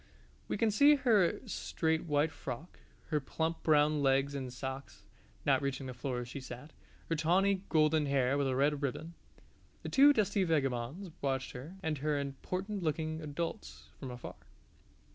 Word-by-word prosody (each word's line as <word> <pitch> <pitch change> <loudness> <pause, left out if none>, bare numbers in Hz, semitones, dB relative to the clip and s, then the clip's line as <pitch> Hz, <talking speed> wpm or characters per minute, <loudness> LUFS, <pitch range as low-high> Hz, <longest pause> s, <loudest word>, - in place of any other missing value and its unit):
We - - -2
can 225 -3 +2
see 285 +8 +6
her 225 -10 +3
straight 160 -7 -1
white 150 0 +1
frock, 140 +7 -7 0.3
her 155 -2 +1
plump 160 +4 -2
brown 150 -1 +3
legs 135 +1 +2
in 135 -2 -4
socks 130 +2 -7 0.4
(not - - +3
reaching 140 -1 -2
the 130 - -5
floor 125 0 -3
as 120 - -7
she 130 - -6
sat), 130 +3 -9 0.3
her 165 - 0
tawny 185 +5 +2
golden 155 -1 +3
hair 135 -1 +2
with 140 -1 +1
a 130 - 0
red 145 +2 +2
ribbon. 155 +5 -3 0.7
The - - -4
two 285 +1 +7
dusty 210 -5 +2
vagabonds 150 +2 -1
watched 135 -2 -1
her, 145 +9 -9
and 155 -3 -1
her 150 0 0
important 185 +9 -4
looking 155 0 -2
adults, 165 +7 -5
from 135 - -6
afar. 125 0 -8
150 Hz, 160 wpm, -33 LUFS, 135-170 Hz, 0.7 s, two